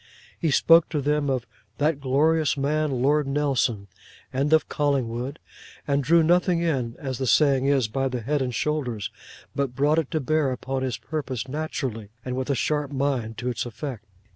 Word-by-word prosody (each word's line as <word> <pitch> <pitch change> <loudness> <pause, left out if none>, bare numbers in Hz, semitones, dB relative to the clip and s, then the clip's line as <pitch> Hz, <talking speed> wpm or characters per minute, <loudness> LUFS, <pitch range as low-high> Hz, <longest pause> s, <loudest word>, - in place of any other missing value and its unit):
He 165 - +1
spoke 165 +3 +5
to 155 - -1
them 145 0 0
of 130 -3 -1 0.3
'that 150 0 +1
glorious 150 +4 +2
man, 150 +2 +1
Lord 145 +1 +3
Nelson,' 135 -7 0 0.5
and 140 +3 0
of 160 0 +4
Collingwood; 135 -1 -1 0.5
and 140 -1 +1
drew 165 +5 +5
nothing 175 +1 +3
in, 135 -9 -1
as 130 -3 -5
the 130 - -1
saying 135 -1 +4
is, 135 -5 +3
by 135 +5 -1
the 125 -2 -3
head 145 +5 0
and 125 -2 -2
shoulders, 125 -7 -2 0.4
but 135 -3 -1
brought 145 +4 +3
it 155 - -2
to 155 - -1
bear 150 0 +1
upon 130 +1 -3
his 130 -4 -2
purpose, 135 -6 -4
naturally, 130 -7 -4 0.2
and 125 -1 -3
with 130 +1 -3
a 140 - +2
sharp 145 +2 -1
mind 130 -5 -1
to 125 +2 -2
its 125 - -2
effect. 120 -1 -6
140 Hz, 180 wpm, -25 LUFS, 125-150 Hz, 0.5 s, spoke